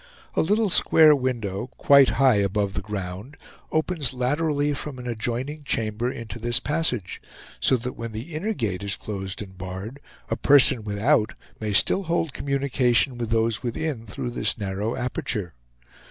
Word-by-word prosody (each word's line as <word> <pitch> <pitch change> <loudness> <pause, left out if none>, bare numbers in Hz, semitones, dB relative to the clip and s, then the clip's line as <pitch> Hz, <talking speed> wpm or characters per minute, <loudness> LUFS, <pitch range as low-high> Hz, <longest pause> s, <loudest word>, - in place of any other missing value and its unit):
A - - +2
little 210 +4 +2
square 155 -2 +6
window, 120 -6 -2
quite 140 -2 +6
high 130 -4 +5
above 100 0 0
the 95 - -2
ground, 100 +5 -6 0.3
opens 155 -5 0
laterally 145 +3 +1
from 145 -1 -6
an 125 - -8
adjoining 125 +5 -3
chamber 115 -1 -1
into 115 -1 -7
this 120 +1 0
passage; 130 - -1 0.4
so 130 - +3
that 125 +2 -5
when 115 -1 -6
the 115 +10 -7
inner 205 +8 -2
gate 100 - -2
is 100 -1 -2
closed 95 -1 -5
and 95 -2 -14
barred, 95 +8 -6 0.3
a - - -1
person 135 -4 +5
without 110 +3 +1 0.2
may 110 -1 -2
still 110 - +3
hold 165 -3 0
communication 135 -2 +1
with 115 -2 -3
those 115 -1 +1
within 125 -1 -3
through 120 +5 -4
this 120 - 0
narrow 100 +2 -2
aperture. 105 -6 -3
120 Hz, 155 wpm, -24 LUFS, 105-140 Hz, 0.4 s, square